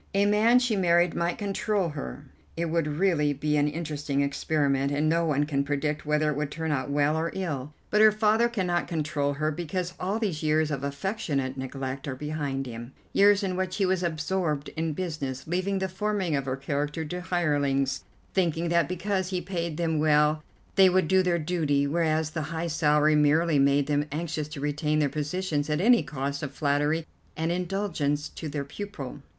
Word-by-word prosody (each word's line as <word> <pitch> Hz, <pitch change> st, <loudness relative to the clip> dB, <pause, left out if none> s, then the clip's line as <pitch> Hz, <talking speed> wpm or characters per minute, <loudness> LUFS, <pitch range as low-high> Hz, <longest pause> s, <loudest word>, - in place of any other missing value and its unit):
A 200 Hz, +1 st, +4 dB
man 215 Hz, +4 st, +5 dB
she 250 Hz, -3 st, +2 dB
married 175 Hz, -2 st, +3 dB
might 170 Hz, 0 st, -1 dB
control 200 Hz, -2 st, -1 dB
her. 145 Hz, -1 st, -7 dB, 0.3 s
It 170 Hz, -1 st, -1 dB
would 165 Hz, -2 st, +1 dB
really 160 Hz, -6 st, +2 dB
be 150 Hz, +2 st, -1 dB
an 145 Hz, 0 st, +3 dB
interesting 150 Hz, -2 st, -2 dB
experiment, 140 Hz, -1 st, 0 dB
and 145 Hz, +2 st, +1 dB
no 165 Hz, +1 st, +2 dB
one 145 Hz, -1 st, +2 dB
can 140 Hz, -2 st, 0 dB
predict 150 Hz, +1 st, -2 dB
whether 150 Hz, 0 st, +2 dB
it -, -, -3 dB
would 150 Hz, 0 st, -2 dB
turn 160 Hz, +1 st, -3 dB
out 140 Hz, -1 st, -1 dB
well 145 Hz, +1 st, +2 dB
or 160 Hz, +1 st, 0 dB
ill; 150 Hz, -6 st, -4 dB, 0.2 s
but 210 Hz, -, +4 dB
her 215 Hz, 0 st, +8 dB
father 215 Hz, +2 st, +3 dB
cannot 180 Hz, -6 st, -1 dB
control 150 Hz, -3 st, -1 dB
her 155 Hz, +2 st, -1 dB
because 175 Hz, +3 st, -3 dB
all 195 Hz, +4 st, -1 dB
these 200 Hz, -9 st, -2 dB
years 155 Hz, 0 st, +2 dB
of 140 Hz, -2 st, -3 dB
affectionate 140 Hz, -3 st, -2 dB
neglect 135 Hz, 0 st, -5 dB
are 130 Hz, -, -3 dB
behind 145 Hz, -1 st, -3 dB
him, 120 Hz, +1 st, -8 dB, 0.2 s
years 205 Hz, 0 st, +5 dB
in 185 Hz, -2 st, -1 dB
which 185 Hz, 0 st, -2 dB
he 200 Hz, -, +1 dB
was 185 Hz, -1 st, +1 dB
absorbed 160 Hz, -2 st, -1 dB
in 160 Hz, -1 st, -2 dB
business, 145 Hz, -6 st, -4 dB
leaving 185 Hz, +4 st, -1 dB
the 190 Hz, 0 st, -1 dB
forming 190 Hz, -3 st, -1 dB
of 140 Hz, -1 st, -1 dB
her 130 Hz, 0 st, -2 dB
character 145 Hz, +3 st, -2 dB
to 180 Hz, +4 st, -5 dB
hirelings, 145 Hz, -7 st, 0 dB, 0.3 s
thinking 170 Hz, -2 st, +1 dB
that 170 Hz, 0 st, +2 dB
because 185 Hz, 0 st, -1 dB
he 185 Hz, -1 st, -1 dB
paid 170 Hz, -3 st, -3 dB
them 165 Hz, -2 st, 0 dB
well 150 Hz, 0 st, +3 dB, 0.4 s
they 190 Hz, -1 st, +8 dB
would 185 Hz, -2 st, +2 dB
do 190 Hz, +2 st, +4 dB
their 180 Hz, -2 st, +1 dB
duty, 155 Hz, -4 st, +1 dB
whereas 155 Hz, 0 st, +1 dB
the 155 Hz, -, -3 dB
high 165 Hz, 0 st, -3 dB
salary 150 Hz, -1 st, +3 dB
merely 150 Hz, +1 st, +3 dB
made 140 Hz, +1 st, +3 dB
them 145 Hz, 0 st, 0 dB
anxious 155 Hz, -1 st, -3 dB
to 150 Hz, -1 st, -8 dB
retain 150 Hz, +1 st, 0 dB
their 150 Hz, -2 st, +2 dB
positions 150 Hz, 0 st, -2 dB
at 150 Hz, 0 st, +1 dB
any 235 Hz, +5 st, +5 dB
cost 140 Hz, -1 st, -4 dB
of 145 Hz, -3 st, -4 dB
flattery 145 Hz, +3 st, 0 dB, 0.3 s
and 160 Hz, +1 st, 0 dB
indulgence 175 Hz, -5 st, -1 dB
to 160 Hz, -, -7 dB
their 140 Hz, -1 st, -3 dB
pupil." 145 Hz, -5 st, -7 dB
155 Hz, 190 wpm, -27 LUFS, 145-180 Hz, 0.4 s, her